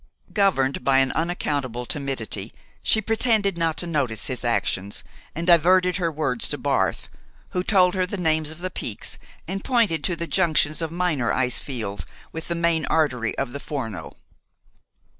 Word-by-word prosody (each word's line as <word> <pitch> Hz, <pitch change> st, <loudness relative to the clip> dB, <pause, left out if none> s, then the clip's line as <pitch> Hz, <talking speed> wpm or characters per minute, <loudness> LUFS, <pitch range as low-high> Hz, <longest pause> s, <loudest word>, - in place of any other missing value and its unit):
Governed 140 Hz, -, +2 dB
by 135 Hz, 0 st, +4 dB
an 135 Hz, 0 st, +4 dB
unaccountable 145 Hz, -7 st, -2 dB
timidity, 120 Hz, -7 st, -3 dB, 0.3 s
she 220 Hz, -, +4 dB
pretended 220 Hz, -3 st, +2 dB
not 165 Hz, -2 st, 0 dB
to -, -, -3 dB
notice 140 Hz, -10 st, 0 dB
his 130 Hz, -1 st, -2 dB
actions, 100 Hz, -4 st, -1 dB, 0.3 s
and 165 Hz, +2 st, -3 dB
diverted 180 Hz, +2 st, +5 dB
her 170 Hz, -3 st, 0 dB
words 140 Hz, -6 st, -1 dB
to -, -, -3 dB
Barth, -, -, 0 dB, 0.4 s
who 180 Hz, -, 0 dB
told 185 Hz, -3 st, +4 dB
her 185 Hz, -1 st, +1 dB
the 200 Hz, -, -4 dB
names 160 Hz, -3 st, +1 dB
of 160 Hz, +2 st, -9 dB
the 185 Hz, 0 st, -3 dB
peaks 105 Hz, -, -3 dB, 0.3 s
and 195 Hz, +3 st, -4 dB
pointed 230 Hz, -11 st, +2 dB
to 180 Hz, -, 0 dB
the 170 Hz, 0 st, -4 dB
junctions 160 Hz, -4 st, +2 dB
of 165 Hz, -, -1 dB
minor 170 Hz, -8 st, 0 dB
ice 125 Hz, -1 st, +1 dB
fields 110 Hz, -8 st, -4 dB, 0.3 s
with 160 Hz, 0 st, -6 dB
the 170 Hz, -, 0 dB
main 170 Hz, -1 st, +1 dB
artery 125 Hz, -8 st, +1 dB
of 135 Hz, -2 st, -2 dB
the 140 Hz, -, -4 dB
Forno. 120 Hz, -10 st, -5 dB
160 Hz, 165 wpm, -24 LUFS, 130-180 Hz, 0.4 s, diverted